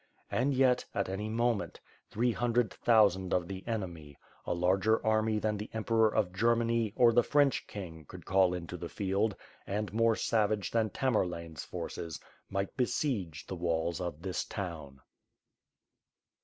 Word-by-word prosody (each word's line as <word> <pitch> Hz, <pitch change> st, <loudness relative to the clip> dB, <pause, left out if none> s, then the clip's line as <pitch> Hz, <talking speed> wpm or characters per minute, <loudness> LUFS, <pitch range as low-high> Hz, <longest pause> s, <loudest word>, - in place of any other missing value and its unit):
And, 140 Hz, -, +1 dB
yet, 130 Hz, -1 st, +4 dB
at 100 Hz, -1 st, 0 dB
any 105 Hz, +3 st, -3 dB
moment, 115 Hz, -1 st, 0 dB, 0.3 s
three 120 Hz, +3 st, +1 dB
hundred 120 Hz, 0 st, +1 dB
thousand 100 Hz, -6 st, +3 dB
of 90 Hz, -2 st, 0 dB
the 95 Hz, 0 st, -6 dB
enemy, 85 Hz, -, -5 dB, 0.3 s
a -, -, +1 dB
larger 95 Hz, +5 st, +2 dB
army 110 Hz, 0 st, +2 dB
than 105 Hz, 0 st, 0 dB
the 105 Hz, +2 st, -6 dB
emperor 110 Hz, 0 st, +2 dB
of 100 Hz, -5 st, 0 dB
Germany, 115 Hz, +1 st, +2 dB
or 120 Hz, -1 st, +5 dB
the 120 Hz, -, +6 dB
French 145 Hz, +1 st, +2 dB
king, 80 Hz, -6 st, -8 dB
could -, -, -11 dB
call 95 Hz, -1 st, +4 dB
into 90 Hz, 0 st, -6 dB
the 85 Hz, 0 st, -6 dB
field, 100 Hz, +1 st, 0 dB, 0.3 s
and 105 Hz, +1 st, -2 dB
more 115 Hz, 0 st, +3 dB
savage 105 Hz, -3 st, 0 dB
than 110 Hz, -2 st, +1 dB
Tamerlane^s 85 Hz, -, -1 dB
forces, 80 Hz, -4 st, -5 dB, 0.3 s
might 100 Hz, 0 st, -2 dB
besiege 110 Hz, -, -1 dB
the 95 Hz, -, -5 dB
walls 85 Hz, 0 st, -1 dB
of 85 Hz, -2 st, -5 dB
this 95 Hz, -2 st, -2 dB
town. 80 Hz, -8 st, -6 dB
105 Hz, 150 wpm, -31 LUFS, 90-115 Hz, 0.3 s, the